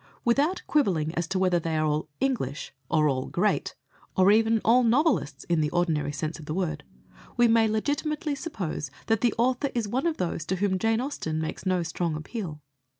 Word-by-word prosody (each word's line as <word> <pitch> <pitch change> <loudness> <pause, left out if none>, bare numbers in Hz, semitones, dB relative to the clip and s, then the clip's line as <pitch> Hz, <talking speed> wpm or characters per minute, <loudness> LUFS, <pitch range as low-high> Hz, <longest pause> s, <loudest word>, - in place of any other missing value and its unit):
Without 285 +10 +2
quibbling 175 - +1
as 170 -1 -2
to 195 - -1
whether 185 -2 +2
they 165 -1 -2
are 155 - +1
all 155 +1 -1
"English," 230 - -2 0.2
or 155 -2 +3
all 130 -2 -1
"great," - - 0 0.4
or 190 +1 +6
even 225 +1 +4
all 245 +3 +5
"novelists" 235 - +2
in 170 -2 +1
the 150 - +1
ordinary 160 -4 0
sense 155 +3 -4
of 155 - -10
the 155 - -3
word, 180 -4 -2 0.5
we 240 0 +6
may 225 -1 +4
legitimately 290 +7 -1
suppose 200 - -4 0.2
that 225 -2 +1
the 240 -3 +2
author 255 +4 +1
is 230 -3 0
one 260 +9 0
of 325 - -1
those 170 -2 -2
to 190 - 0
whom 190 0 0
Jane 225 +2 +1
Austen 165 - -3
makes 160 +4 -4
no 185 -2 +2
strong 165 0 -2
appeal. 155 -1 -6
190 Hz, 195 wpm, -27 LUFS, 155-240 Hz, 0.5 s, or